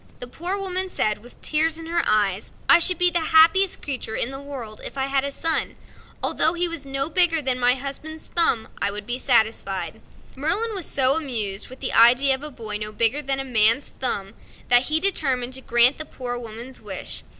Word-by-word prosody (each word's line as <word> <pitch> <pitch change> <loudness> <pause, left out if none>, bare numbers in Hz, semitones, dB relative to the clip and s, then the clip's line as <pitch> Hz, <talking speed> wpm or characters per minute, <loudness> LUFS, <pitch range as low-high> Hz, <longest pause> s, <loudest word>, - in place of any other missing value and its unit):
The - - -6
Poor 345 +10 -3
Woman 380 -1 0
said, 215 -11 -2
with 240 +3 -17
tears 315 +1 +1
in 330 - -8
her 340 +1 -1
eves: 205 -2 -1
"I 345 - +6
should 360 +1 +4
be 360 0 +6
the 345 - +1
happiest 330 +4 +3
creature 255 -5 -4
in 245 - 0
the 270 0 -8
world 255 -7 -9
if - - -6
I 265 - -1
had 275 0 -1
a 280 - -3
son 320 +3 -1 0.5
although 320 - +2
he 350 0 -1
was 335 -4 -4
no 275 +1 -2
bigger 340 -1 +4
than 260 -3 -1
my 245 0 +2
husband's 280 +4 -7
thumb." 325 -10 +3 0.2
Merlin 235 - -2
was 380 -5 -3
so 265 -1 +2
much 325 - -1
amused 215 -8 -3
with 255 - -14
the - - -1
idea 250 +4 +5
of 265 - -5
a 300 - -7
boy 220 -6 -5
no 210 0 -5
bigger 230 +6 +2
than 270 -1 -1
a - - -3
man's 230 +1 +2
thumb 205 -6 -3 0.4
that 245 +1 +4
he 310 +1 +2
determined 270 -9 +1
to 265 - -1
grant 240 +3 +5
the 310 - -4
Poor 245 -4 -6
Woman's 240 +2 -9
wish. - - -7
270 Hz, 200 wpm, -22 LUFS, 235-320 Hz, 0.5 s, I